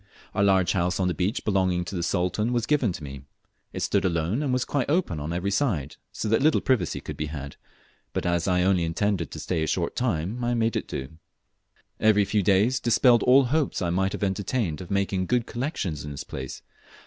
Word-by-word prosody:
A - - 0
large 95 -2 +4
house 90 +1 0
on 95 - +2
the 90 - 0
beach 90 - -2
belonging 95 -3 +1
to 95 - -6
the 85 - -1
Sultan 90 +6 0
was 120 -2 0
given 135 -6 +2
me. 70 -2 -8 0.5
It - - -5
stood - - +1
alone, 85 - 0
and 145 -3 -1
was 125 -1 +1
quite 140 -2 -1
open 150 - 0
on 75 +2 -4
every 90 +3 -1
side, 95 - -1
so - - -4
that 115 +3 +2
little 155 +2 +4
privacy 115 -10 0
could - - -7
be 75 - -3
had, 70 -2 -7 0.6
but - - -3
as 85 +1 0
I 90 -1 +2
only 95 -2 +3
intended 85 0 -1
to - - -8
stay 85 -3 -2
a 80 - 0
short - - -1
time 110 0 -1
I 120 0 +1
made 115 0 +1
it - - -2
do. 75 +5 -6 0.8
Avery, 105 -2 +4
few 105 +1 +1
days 100 +7 +3
dispelled 120 0 +4
all 130 +2 +6
hopes 145 +3 0
I 85 -3 -1
might 95 +2 0
have - - -4
entertained 95 -2 -1
of 90 - -9
making 100 -2 0
good 120 -2 +1
collections 120 - -3
in 75 - -6
this 70 - -6
place. - - -7
95 Hz, 215 wpm, -26 LUFS, 85-120 Hz, 0.8 s, all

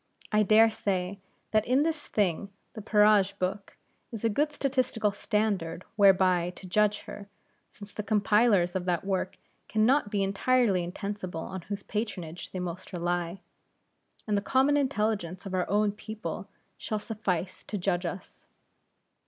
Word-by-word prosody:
I 215 0 +4
dare 220 +2 +6
say, 195 -2 -2 0.3
that 215 -1 +3
in 260 +4 +4
this 315 -2 -2
thing 200 -1 0 0.2
the 215 - -7
Peerage 210 -1 +4
Book 190 +2 -3 0.3
is 225 -2 -6
a 225 - +2
good 295 +6 +1
statistical 255 -7 0
standard 200 -5 -1
whereby 185 -3 +4
to - - -11
judge 210 +2 +2
her; 200 - -9 0.4
since 205 0 -12
the - - -3
compilers 210 -3 +3
of 185 -1 -1
that 180 0 0
work 190 -1 -2 0.3
can 215 0 +2
not 265 -2 +3
be 205 -1 0
entirely 200 -1 +2
insensible 185 -1 -5
on 190 +2 -6
whose 200 +2 -6
patronage 190 -6 -4
they - - -7
most 180 +1 -5
rely; 175 +1 -2 0.8
and 210 - 0
the 200 - +1
common 265 +6 +3
intelligence 215 - -1
of 195 - -6
our 185 -1 0
own 210 +1 +2
people 215 +1 -6 0.3
shall 215 - -2
suffice 205 -5 -3
to 210 - -4
judge 180 -1 0
us. 180 +2 -8
205 Hz, 155 wpm, -28 LUFS, 185-215 Hz, 0.8 s, dare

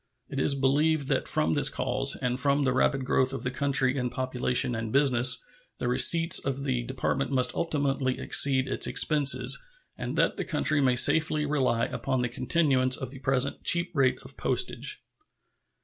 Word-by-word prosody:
It 135 - -5
is 140 +1 +2
believed 145 +2 0
that - - -1
from 80 +1 0
this - - +1
cause - - -2
and 125 0 -3
from 140 +2 0
the 130 -2 0
rapid 130 +1 0
growth 130 +1 0
of 135 - -6
the 125 - -3
country 135 0 0
in 125 -2 -3
population 125 -1 -1
and 115 -1 -5
business 125 -3 +2 0.3
the 120 - -4
receipts 165 +7 +4
of 135 0 -5
the 130 -3 -2
Department 130 +2 -3
must 130 -2 0
ultimately 140 -5 -2
exceed 135 -2 +3
its - - +1
expenses, 150 - +3 0.3
and - - -6
that - - 0
the - - -3
country 150 -1 -1
may 130 -2 +1
safely 155 +3 +3
rely 130 -6 -1
upon 130 -2 -3
the 125 - -2
continuance 130 0 0
of 130 -2 -7
the 135 - -11
present 135 +1 -1
cheap 170 +1 +3
rate 135 -3 +1
of - - -14
postage. - - -3
135 Hz, 175 wpm, -26 LUFS, 125-140 Hz, 0.3 s, receipts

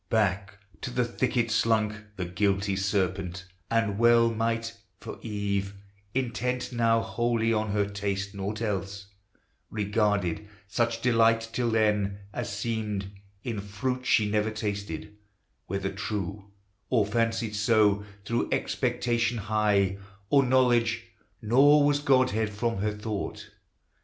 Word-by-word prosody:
Back 100 -2 0 0.2
to - - -3
the 125 0 0
thicket 120 -1 0
slunk 110 -1 +2 0.2
The 90 - -3
guilty 100 +2 0
serpent, 95 -2 -1 0.2
and 110 -3 +1
well 115 0 +5
might, 115 +1 -1 0.2
for - - -8
Eve 100 -2 -2 0.4
Intent 125 0 -1
now 115 -1 +3
wholly 115 -1 0
on 110 0 0
her 100 0 +1
taste 100 0 -3
nought 100 +3 -4
else 100 -1 -3 0.6
Regarded, 105 -3 0 0.2
such 115 +2 -1
delight 115 -2 +3
till 120 -1 0
then, 105 -3 +1 0.2
as - - -3
seemed, 105 -2 -3 0.3
In 115 -4 -3
fruit 125 +6 -3
she 105 - +4
never 105 +1 +1
tasted, 105 -4 -4 0.5
whether 100 +1 -2
true 100 -1 -4 0.4
Or 115 -5 +3
fancied 115 0 0
so, 105 -1 +3 0.2
through 115 +3 -1
expectation 120 -2 0
high 105 -2 +1 0.3
Of 140 -2 +5
knowledge: 125 -2 +2 0.3
nor 145 +6 +6
was 145 0 +3
Godhead 130 -6 +2
from 115 +2 -2
her 105 +2 0
thought. 105 -1 -5
110 Hz, 120 wpm, -27 LUFS, 100-115 Hz, 0.6 s, nor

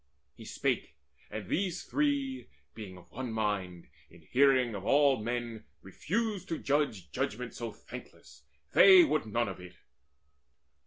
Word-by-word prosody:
He - - -13
spake, - - -2 0.3
and 110 -3 -6
these 180 - -1
three, 285 -3 -1 0.3
being 100 -5 -9
of 90 -1 -17
one 125 0 -5
mind, 100 -6 -2 0.2
In - - -18
hearing 130 -3 +3
of 100 -2 -6
all 140 -1 +4
men 115 -1 -4 0.2
refused 195 - -3
to 165 - -1
judge 140 - -1
Judgment 120 +3 -3
so 115 -1 -5
thankless: - - -12 0.3
they 375 -2 +9
would 155 - 0
none 115 +2 0
of 95 - -6
it. 90 0 -12
120 Hz, 140 wpm, -31 LUFS, 105-165 Hz, 0.3 s, they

